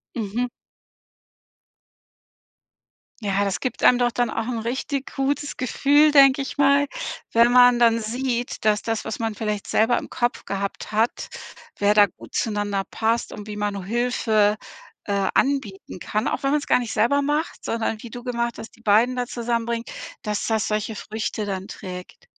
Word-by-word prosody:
Mhm. 235 +2 -2 2.7
Ja, 200 -1 0
das 200 -2 -1
gibt 255 - -4
einem 245 - +7
doch 240 -1 +2
dann 245 0 0
auch 225 +1 -3
'n 235 -2 -2
richtig 265 +4 -3
gutes 285 +1 -1
Gefühl, 290 +4 +3
denke 275 -1 +6
ich 275 - -6
mal, 280 0 +4 0.5
wenn 235 +1 +5
man 245 0 +7
dann 230 -1 +4
sieht, 240 +2 -3
dass 210 -1 +3
das, 225 -1 -2
was 220 - -5
man 225 -2 -2
vielleicht 210 -1 -3
selber 225 +3 +3
im - - -5
Kopf 240 +1 -2
gehabt 200 +2 -4
hat, 220 +3 0 0.5
wer 205 0 +3
da 210 -1 +7
gut - - -14
zueinander 205 -3 -1
passt 225 +1 0
und 210 - -8
wie 210 -1 -7
man 205 -2 -2
Hilfe, 220 -1 +2 0.5
äh, 200 -1 0
anbieten 260 -10 -1
kann, 215 +4 -1
auch - - -3
wenn 275 - +2
man's 295 0 0
gar - - +4
nicht 240 -3 -4
selber 280 +6 +3
macht, 295 +3 -2
sondern 225 -1 -2
wie 235 - -9
du 245 +2 -8
gemacht 235 -2 -2
hast, 225 - -9
die - - -21
beiden 230 +4 +3
da 250 - 0
zusammenbringen, 235 -1 -2 0.4
dass 210 -1 -2
das 220 -2 +1
solche 215 +1 -2
Früchte 215 0 -4
dann 195 -1 -4
trägt. 180 - -9
230 Hz, 170 wpm, -23 LUFS, 210-250 Hz, 2.7 s, einem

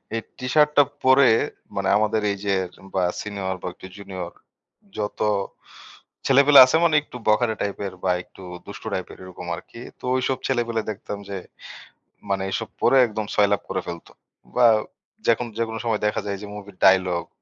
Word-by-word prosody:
এই 115 - -1 0.2
T-shirt 150 +4 +3
টা 145 - +9 0.2
পরে 130 +1 +6 0.5
মানে - - 0
আমাদের 110 0 +1
এই 100 - -3
যে 100 - +2 0.4
বা 95 - +2 0.2
senior 100 -3 -3
বা - - -3
একটু 95 - -12
junior, 95 -4 -7 0.7
যত 105 -1 -4 1.1
ছেলেপেলে 140 +1 +7
আছে 130 - 0
মানে 165 -2 +4
একটু 125 - -10
বখাটে 110 +1 +3
type-এর 100 -1 -3
বা 95 - +2
একটু 95 - -16 0.2
দুষ্টু - - -8
type-এর - - -5
এরকম 90 -1 -9
আরকি। 115 +6 -12 0.2
তো - - -10
ওইসব 130 0 0
ছেলেপেলে 120 -3 0
দেখতাম 105 0 -7
যে, 100 - -4 0.9
মানে 95 -1 0
এসব 95 - -3
পরে 135 - +4
একদম 110 -1 -4
সয়লাব 100 -1 +3
করে 95 - -1
ফেলত 85 -1 -7 0.5
বা 125 - +6 0.6
যেকোন 115 +1 +2
যেকোনো 115 -1 -2
সময়ে 110 -3 0
দেখা 105 - 0
যায় 100 -1 -3
যে - - -6
movie-র 100 -2 -10
dialogue, 95 -2 +3
105 Hz, 160 wpm, -23 LUFS, 95-120 Hz, 1.1 s, টা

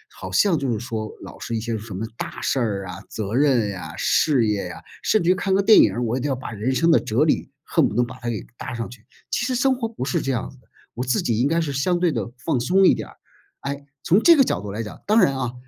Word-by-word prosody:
好 - - -8
像 185 -7 +3
就 135 -3 -1
是 110 - -1
说 110 -2 -4
老 - - -11
是 115 - -4
一 - - 0
些 115 +1 -3
什 110 0 -8
么 100 +4 -3
大 - - -6
事 135 - 0
儿 100 -5 -1
啊， 90 +1 -8
责 110 -1 -4
任 130 -6 +3
呀、 85 -4 -7
事 135 -7 +3
业 100 -4 -1
呀， 90 - -8 0.2
甚 215 - +2
至 175 - +4
于 - - +6
看 190 +1 -2
个 195 - +2
电 215 +2 +7
影 - - +6
儿， 120 - -2
我 115 +1 -1
一 130 - -2
定 145 - -1
要 135 - 0
把 130 - -7
人 115 +5 -2
生 165 +4 +3
的 - - +6
哲 115 +7 +1
理 155 - +1
恨 160 -5 +2
不 - - -7
能 125 - +3
把 130 +1 -11
它 120 - -4
给 110 -3 -4
搭 120 - -6
上 115 0 -4
去。 120 -3 -14 0.3
其 - - 0
实 255 +1 -1
生 260 +2 +2
活 235 -3 -3
不 220 - -5
是 135 - 0
这 135 - -1
样 120 - -3
子 135 - -18
的， - - -29 0.3
我 125 - -3
自 125 -2 +1
己 115 -2 0
应 125 - +3
该 165 +3 +1
是 150 -4 -2
相 175 +6 +1
对 175 -2 +2
地 115 -3 -3
放 125 - -1
松 185 +10 +3
一 - - +7
点 - - -5
儿。 - - -18 0.4
哎， 140 0 -5 0.2
从 190 +7 +4
这 335 +4 +7
个 275 - +6
角 - - -1
度 100 -1 -6
来 110 +3 -4
讲， 105 - -10
当 215 +2 +5
然 140 -10 +4
啊， 125 -2 -3
125 Hz, 320 characters per minute, -23 LUFS, 110-165 Hz, 0.4 s, 电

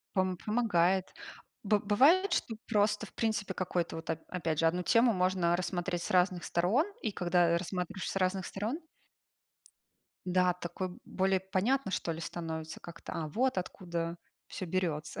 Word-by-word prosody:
Пом 185 -1 +1
помогает. 190 -4 +1 0.5
Бы 210 0 +3
бывает, 295 - +4
что 225 -9 0
просто, 210 -1 +2
в - - -18
принципе, 215 -4 -1
какой-то. 175 -2 -1
Вот, 160 - -5
оп 160 - -2
опять 165 -4 -2
же, 165 - +3
одну 175 +2 +2
тему 230 +4 +4
можно 180 -2 +2
рассмотреть 175 -1 -2
с - - -5
разных 180 -1 +3
сторон, 200 - +2 0.2
и 220 - -1
когда, 175 -1 +2
э, 170 - +3
рассматриваешь 180 +1 -3
с - - -6
разных 185 0 +1
сторон 225 - -3 1.4
Да, 180 0 +3
такой 180 +1 -4 0.2
более 190 0 +1
понятно 195 +6 0
что 170 -2 -1
ли 160 - -6
становится 160 -2 -5
как-то. 170 - -9
А, 160 -2 -3
вот 245 - +1
откуда 170 -2 -4 0.3
всё 185 - -6
берется! 165 -4 -2
185 Hz, 160 wpm, -32 LUFS, 170-205 Hz, 1.4 s, бывает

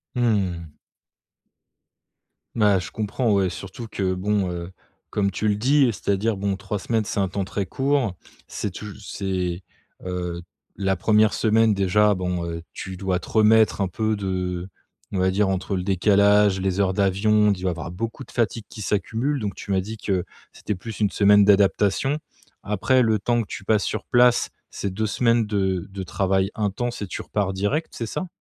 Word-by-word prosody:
Mmh. 95 -10 0 1.8
Bah, 105 -4 +4
je - - -6
comprends, 110 +1 -1
ouais, 95 -2 +2
surtout 95 +6 -8
que 95 -2 -1
bon, 95 0 0
heu, 85 +1 -5 0.4
comme 100 -1 0
tu 105 +3 -1
le 105 - +2
dis, 135 +4 +4
c'est-à-dire, 100 0 0
bon 100 0 -1
3 100 +1 -4
semaines, 110 +1 0
c'est 100 - -3
un 95 - +2
temps 95 +1 -3
très 100 +1 -3
court, 135 -5 0 0.3
c'est 100 - -4
touj 105 +1 -8
c'est, 95 -2 -3 0.4
heu. 90 -1 -3 0.4
La 95 0 +1
1re 105 +3 +3
semaine 110 -1 +3
déjà, 100 +2 +3
bon, 90 -2 -2
heu, 85 0 -5
tu 95 -1 -7
dois 95 -1 -1
te - - -11
remettre 110 -1 +4
un 95 - 0
peu 110 +2 -1
de, 90 -2 -3 0.4
on 95 - -1
va 95 0 +2
dire, 100 0 +2
entre 95 +1 -1
le 90 - -2
décalage, 100 0 +4
les 95 0 -1
heures 95 -1 +2
d'avion, 105 +2 +3
tu 90 -2 -3
vas 90 - +2
avoir 85 0 -6
beaucoup 115 +7 -5
de - - -16
fatigue 115 -1 -1
qui 110 - -9
s'accumule, 115 +8 -1
donc 100 -2 -2
tu 100 - -7
m'as 95 -1 +2
dit 110 +4 -7
que 95 -4 -1 0.3
c'était 105 - -4
plus 110 +3 -8
1 105 - +3
semaine 105 0 +5
d'adaptation. 105 +7 +3 0.4
Après 105 +6 +2
le 110 -2 +2
temps 120 +4 +1
que 110 - -6
tu 100 - -7
passes 105 -2 +2
sur 110 - -3
place, 120 0 +4 0.2
c'est 100 -2 -4
2 110 +2 -1
semaines 115 +1 +2
de 95 -4 -1
de 95 -1 -6
travail 95 +1 0
intense 110 +3 -2
et 100 - -3
tu - - -5
repars 100 -2 -1
direct, 105 - -1
c'est 115 - -4
ça? 185 +11 -4
100 Hz, 185 wpm, -23 LUFS, 95-110 Hz, 1.8 s, semaine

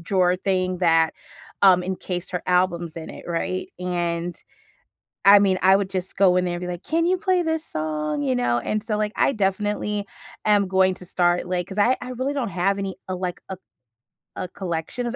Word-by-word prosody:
drawer 180 0 +2
thing, 185 -1 -1
that, 165 -2 +3 0.5
um, 185 -2 +6
encased 180 -1 -4
her 180 -2 -3
albums 175 -2 +1
in 160 - -7
it, - - -11
right? 180 +2 -2
And, 175 -1 -2 0.9
I 200 +1 +9
mean, 190 -2 +3
I 190 +1 +6
would 195 -1 0
just 185 -1 -4
go 185 -2 +5
in 180 - +1
there 175 - -2
and 175 - -6
be 180 - -4
like, 175 -1 -5
"Can 330 +1 0
you 370 +1 +2
play 370 -2 +1
this 320 0 -1
song?" 150 -1 -3
You 130 -2 +1
know, 120 -1 +1
and 215 - -2
so, 215 -1 -2
like, 210 0 -1
I - - +3
definitely 205 0 -1 0.4
am 205 -2 +4
going 190 0 +3
to 180 - -12
start, 175 0 +1
like 180 -1 -2
'cause 195 +1 -9
I 245 +5 +4
I 250 0 -6
really 260 +3 -2
don't 250 -7 -2
have 190 +3 0
any, 195 -1 -3
uh, 185 - -1
like, 180 -1 -4
a 190 - -5 0.8
a 185 - -3
collection 180 +6 -4
of 240 - -3
185 Hz, 205 wpm, -23 LUFS, 175-205 Hz, 0.9 s, I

